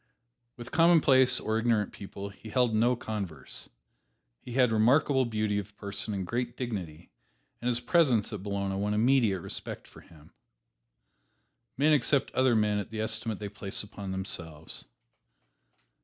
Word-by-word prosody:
With 120 Hz, +1 st, -9 dB
commonplace 155 Hz, -6 st, +5 dB
or 110 Hz, 0 st, -1 dB
ignorant 115 Hz, -3 st, +1 dB
people 100 Hz, 0 st, -8 dB
he 105 Hz, +2 st, -12 dB
held 125 Hz, 0 st, +2 dB
no 120 Hz, +3 st, +3 dB
converse. 100 Hz, -, -6 dB, 0.7 s
He 120 Hz, -, -9 dB
had 125 Hz, -2 st, +3 dB
remarkable 130 Hz, +4 st, +3 dB
beauty 110 Hz, -3 st, -1 dB
of 100 Hz, 0 st, -9 dB
person 100 Hz, +1 st, -3 dB
and 95 Hz, -2 st, -3 dB
great 120 Hz, +4 st, -3 dB
dignity, 90 Hz, -10 st, -5 dB, 0.5 s
and 120 Hz, -, -3 dB
his 120 Hz, -1 st, +2 dB
presence 125 Hz, -, +2 dB
at 105 Hz, -, -5 dB
Bologna 100 Hz, -1 st, -2 dB
won 105 Hz, +1 st, -1 dB
immediate 115 Hz, -4 st, +3 dB
respect -, -, -6 dB
for -, -, -15 dB
him. 75 Hz, -3 st, -19 dB, 1.4 s
Men 150 Hz, +3 st, +4 dB
accept 140 Hz, 0 st, +2 dB
other 130 Hz, -2 st, +3 dB
men 105 Hz, -1 st, +2 dB
at 100 Hz, -, -5 dB
the 110 Hz, -1 st, -6 dB
estimate 110 Hz, -1 st, -1 dB
they 105 Hz, -, -5 dB
place 100 Hz, 0 st, -3 dB
upon 100 Hz, -1 st, -8 dB
themselves. 85 Hz, -6 st, -4 dB
110 Hz, 145 wpm, -29 LUFS, 100-125 Hz, 1.4 s, commonplace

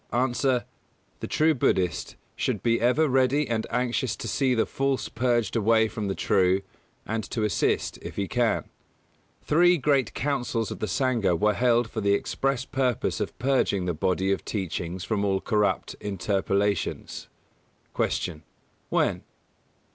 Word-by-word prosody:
_ 120 Hz, +2 st, 0 dB
A. 125 Hz, -2 st, +1 dB, 0.5 s
The -, -, -5 dB
true 155 Hz, +1 st, +3 dB
Buddhist 90 Hz, -, 0 dB, 0.2 s
should -, -, -2 dB
be 115 Hz, 0 st, +2 dB
ever 125 Hz, +7 st, +3 dB
ready 135 Hz, +2 st, +2 dB
and 115 Hz, -2 st, -1 dB
anxious 125 Hz, -1 st, 0 dB
to -, -, -6 dB
see 130 Hz, -3 st, +1 dB
the 110 Hz, -, +2 dB
false 135 Hz, -1 st, -1 dB
purged 120 Hz, -2 st, 0 dB
away 110 Hz, 0 st, +3 dB
from 105 Hz, -1 st, -4 dB
the 95 Hz, -, -2 dB
true, 95 Hz, 0 st, +2 dB, 0.4 s
and 110 Hz, 0 st, -2 dB
to 115 Hz, -, -3 dB
assist, 105 Hz, -, 0 dB
if -, -, -8 dB
he 100 Hz, -1 st, -2 dB
can. 120 Hz, -2 st, 0 dB, 0.8 s
Three 175 Hz, +3 st, +4 dB
great 135 Hz, -5 st, +1 dB
Councils 125 Hz, -5 st, -1 dB
of -, -, -6 dB
the 110 Hz, -, -2 dB
Sangha 110 Hz, -4 st, +1 dB
were 105 Hz, +2 st, +3 dB
held 120 Hz, +1 st, +2 dB
for 110 Hz, -, -4 dB
the 100 Hz, 0 st, +3 dB
express 135 Hz, +3 st, -1 dB
purpose 130 Hz, -5 st, -1 dB
of -, -, -4 dB
purging 125 Hz, -7 st, +1 dB
the 90 Hz, -, 0 dB
body 95 Hz, +4 st, 0 dB
of 100 Hz, -, -1 dB
Teachings 90 Hz, -2 st, -4 dB
from 105 Hz, -1 st, -1 dB
all 95 Hz, -1 st, +1 dB
corrupt 105 Hz, -4 st, 0 dB
interpolations. 100 Hz, 0 st, -1 dB, 0.7 s
192. 80 Hz, -4 st, -1 dB
Q. -, -, -35 dB, 0.4 s
_When? -, -, +1 dB
115 Hz, 155 wpm, -26 LUFS, 100-130 Hz, 0.8 s, Three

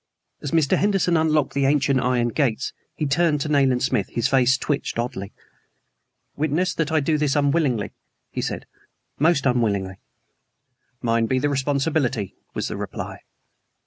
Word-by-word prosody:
As 145 Hz, -, -4 dB
Mr. 155 Hz, -2 st, +2 dB
Henderson 195 Hz, -3 st, +2 dB
unlocked 155 Hz, -3 st, +2 dB
the 140 Hz, -1 st, +1 dB
ancient 140 Hz, -1 st, +2 dB
iron 125 Hz, -1 st, +1 dB
gates 130 Hz, -2 st, -1 dB, 0.2 s
he 155 Hz, -, -2 dB
turned 150 Hz, +1 st, +2 dB
to 150 Hz, -, -2 dB
Nayland 135 Hz, -4 st, +3 dB
Smith. 110 Hz, -7 st, +1 dB
His 120 Hz, -, 0 dB
face 130 Hz, -1 st, +3 dB
twitched 145 Hz, -2 st, -2 dB
oddly. 115 Hz, -5 st, -3 dB, 1.0 s
"Witness 155 Hz, +5 st, 0 dB
that 165 Hz, -1 st, -1 dB
I 160 Hz, -2 st, +3 dB
do 155 Hz, +2 st, +1 dB
this 145 Hz, -2 st, +1 dB
unwillingly," 140 Hz, -6 st, +1 dB, 0.4 s
he -, -, -3 dB
said -, -, -4 dB, 0.5 s
"most 155 Hz, -2 st, +3 dB
unwillingly." 100 Hz, -7 st, 0 dB, 1.0 s
"Mine 115 Hz, -1 st, +2 dB
be 130 Hz, -, +1 dB
the 145 Hz, +3 st, +1 dB
responsibility," 135 Hz, -, 0 dB, 0.2 s
was -, -, -2 dB
the -, -, -5 dB
reply. -, -, -6 dB
140 Hz, 145 wpm, -23 LUFS, 125-155 Hz, 1.0 s, Nayland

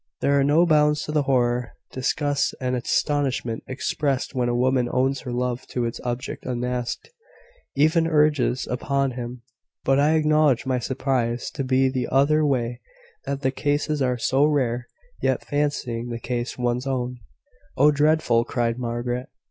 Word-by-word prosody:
There 140 Hz, 0 st, +3 dB
are -, -, +3 dB
no 150 Hz, +5 st, +4 dB
bounds 150 Hz, -2 st, +3 dB
to -, -, -5 dB
the 150 Hz, -1 st, +2 dB
horror, 125 Hz, -3 st, +1 dB, 0.2 s
disgust, 145 Hz, +2 st, 0 dB
and 125 Hz, -1 st, -1 dB
astonishment 130 Hz, -2 st, 0 dB
expressed 135 Hz, +1 st, -2 dB
when 125 Hz, -2 st, 0 dB
a 120 Hz, -, 0 dB
woman 125 Hz, 0 st, +2 dB
owns 130 Hz, +1 st, +1 dB
her 125 Hz, -, -6 dB
love 125 Hz, 0 st, -2 dB
to 120 Hz, -1 st, -2 dB
its 115 Hz, -, -4 dB
object 120 Hz, 0 st, -4 dB
unasked 125 Hz, -, -3 dB, 0.6 s
even 155 Hz, +3 st, +3 dB
urges 150 Hz, -5 st, +2 dB
it -, -, -4 dB
upon 140 Hz, +1 st, 0 dB
him; 120 Hz, 0 st, -7 dB, 0.4 s
but 135 Hz, +1 st, +3 dB
I 150 Hz, +3 st, +4 dB
acknowledge 150 Hz, -5 st, +3 dB
my 130 Hz, -1 st, 0 dB
surprise 125 Hz, -1 st, -1 dB
to 135 Hz, -, -3 dB
be 130 Hz, 0 st, +3 dB
the 130 Hz, -1 st, -1 dB
other 150 Hz, +3 st, +3 dB
way 125 Hz, -4 st, 0 dB, 0.4 s
that 140 Hz, 0 st, -3 dB
the 130 Hz, -, +2 dB
cases 145 Hz, +2 st, -1 dB
are 125 Hz, -1 st, +1 dB
so 135 Hz, +4 st, +2 dB
rare. 125 Hz, -5 st, +1 dB, 0.3 s
Yet, -, -, 0 dB
fancying 135 Hz, -5 st, -2 dB
the 120 Hz, -, -3 dB
case 120 Hz, +1 st, -3 dB
one's 125 Hz, +1 st, -1 dB
own 125 Hz, -2 st, -2 dB, 0.3 s
" -, -, -33 dB
"Oh, 145 Hz, +3 st, +6 dB
dreadful!" 145 Hz, -5 st, +3 dB
cried 120 Hz, 0 st, -1 dB
Margaret. 120 Hz, +2 st, -3 dB
130 Hz, 165 wpm, -24 LUFS, 120-145 Hz, 0.6 s, Oh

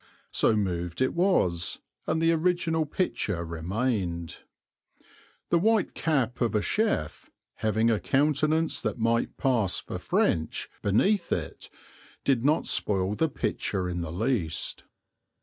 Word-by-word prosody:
So 110 Hz, -, +3 dB
moved 90 Hz, -4 st, -2 dB
it 130 Hz, 0 st, +1 dB
was 170 Hz, -, +1 dB, 0.3 s
and 160 Hz, -, +1 dB
the 165 Hz, 0 st, +3 dB
original 165 Hz, -1 st, +1 dB
picture 105 Hz, -, -1 dB
remained. 85 Hz, 0 st, -2 dB, 1.1 s
The 170 Hz, -, +4 dB
white 220 Hz, 0 st, +2 dB
cap 130 Hz, -7 st, 0 dB
of 115 Hz, -3 st, +1 dB
a 105 Hz, -, +3 dB
chef, 210 Hz, -, -1 dB, 0.3 s
having 110 Hz, +2 st, +2 dB
a 110 Hz, -, +1 dB
countenance 155 Hz, +3 st, +1 dB
that -, -, -2 dB
might 115 Hz, 0 st, 0 dB
pass 115 Hz, -8 st, +2 dB
for -, -, -6 dB
French 80 Hz, -1 st, 0 dB
beneath 180 Hz, -, +2 dB
it, -, -, -3 dB, 0.5 s
did 130 Hz, -4 st, +2 dB
not 150 Hz, +3 st, +2 dB
spoil 95 Hz, -1 st, +1 dB
the 160 Hz, +9 st, +1 dB
picture 95 Hz, -8 st, -2 dB
in 90 Hz, -1 st, -3 dB
the 85 Hz, -2 st, -4 dB
least. 95 Hz, -4 st, -2 dB
115 Hz, 130 wpm, -27 LUFS, -, 1.1 s, The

